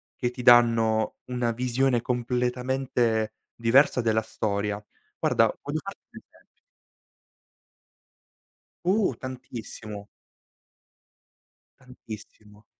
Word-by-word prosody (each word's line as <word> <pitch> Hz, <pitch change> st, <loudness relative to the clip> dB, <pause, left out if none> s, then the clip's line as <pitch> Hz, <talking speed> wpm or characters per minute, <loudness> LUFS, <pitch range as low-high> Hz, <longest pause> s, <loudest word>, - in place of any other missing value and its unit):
che 120 Hz, -, -1 dB
ti 125 Hz, 0 st, -7 dB
danno 115 Hz, -2 st, +5 dB
una 125 Hz, -2 st, -1 dB
visione 125 Hz, +1 st, +1 dB
completamente 125 Hz, -2 st, 0 dB, 0.2 s
diversa 125 Hz, +3 st, +4 dB
della 110 Hz, -1 st, +2 dB
storia. 105 Hz, -1 st, -2 dB, 0.4 s
Guarda, -, -, +4 dB, 0.2 s
voglio 145 Hz, +2 st, -3 dB
farti 195 Hz, -, -8 dB
un -, -, -10 dB
esempio. -, -, -28 dB, 2.2 s
Uh, 190 Hz, -2 st, +2 dB
tantissimo. 110 Hz, -5 st, -8 dB, 1.7 s
Tantissimo. 110 Hz, -4 st, -12 dB
120 Hz, 80 wpm, -26 LUFS, 110-125 Hz, 2.2 s, danno